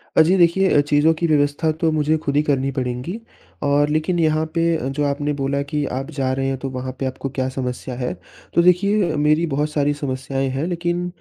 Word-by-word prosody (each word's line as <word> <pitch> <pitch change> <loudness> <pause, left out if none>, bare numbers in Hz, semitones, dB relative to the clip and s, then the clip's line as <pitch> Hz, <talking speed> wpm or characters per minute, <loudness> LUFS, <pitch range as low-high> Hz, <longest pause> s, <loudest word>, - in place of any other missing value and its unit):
अ, - - +7
जी 170 +4 +4
देखिए 175 -2 +4
चीज़ों 145 +2 +3
की 170 +1 -1
व्यवस्था 150 +1 +2
तो 160 - +4
मुझे 155 0 +1
खुद 140 - -1
ही 145 - +4
करनी 135 -2 0
पड़ेंगी 130 - -3 0.4
और 145 +1 +2
लेकिन 155 +4 0
यहाँ 155 -1 +2
पे 165 0 +2
अ, 145 -5 -3
जो 140 +2 -2
आपने 145 +1 -1
बोला 140 0 -1
कि 150 -1 -1
आप 135 +3 -4
जा 135 -3 -1
रहे 135 0 -1
हैं, 135 0 -1
तो 135 +1 -5
वहाँ 130 0 -5
पे 135 - -1
आपको 130 +1 -4
क्या 130 -1 -2
समस्या 130 -1 -4
है? 125 -3 -3 0.4
तो 170 - +4
देखिए 180 -1 +3
मेरी 150 +3 +2
बहुत 150 +2 0
सारी 145 -1 +1
समस्याएँ 135 -1 -3
हैं 135 +4 -2
लेकिन 175 0 -2
145 Hz, 215 wpm, -21 LUFS, 135-160 Hz, 0.4 s, अ